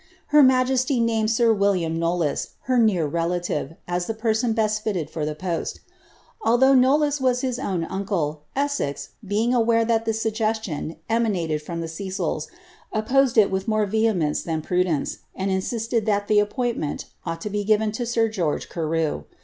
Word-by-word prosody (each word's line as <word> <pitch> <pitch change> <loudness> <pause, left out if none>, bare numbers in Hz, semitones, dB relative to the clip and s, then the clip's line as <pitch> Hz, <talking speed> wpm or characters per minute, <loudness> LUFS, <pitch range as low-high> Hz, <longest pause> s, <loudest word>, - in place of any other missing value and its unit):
Her 300 0 +6
majesty 255 0 +3
named 225 -2 +1
sir 230 0 +3
William 195 -6 +1
Knollvs, 170 -2 -1
her 255 -1 +1
near 200 -8 +3
relative, 170 +1 -2
as 175 0 -2
the 225 - -2
persoa 225 +1 0
best 215 -1 0
filled 180 -8 -2
for 160 - -5
ihe 150 0 -2
post. 175 -2 -3 0.6
Although 265 - +4
Knoliys 280 +2 +3
was 250 -1 +2
his 255 -2 -2
own 185 -9 -1
uncle. 170 -6 -2 0.2
Eswi;. 280 - -1
being 215 +5 0
aware 230 -1 +3
that 225 0 +1
the 225 - +1
suggestion 220 -7 -2
emariaied 190 -10 0
from 170 +2 -5
the 165 - -4
Cecils, 180 -2 -3 0.4
opposed 245 +3 +2
ii 215 - +9
wilh 190 +1 -3
more 215 -1 +2
vehemence 205 -7 +1
than 160 -2 -3
prudence, 180 -5 0 0.2
and 190 +1 -1
insisted 225 +3 -1
that 205 -1 +1
the 210 -1 +4
appiiintiiifnl 210 - -2 0.2
ought 165 0 -3
to 210 - -4
be 205 0 -1
given 215 0 +2
lo - - 0
sir 230 -1 +2
George 180 -9 -2
Carew. 165 -2 -1
215 Hz, 165 wpm, -23 LUFS, 170-230 Hz, 0.6 s, ii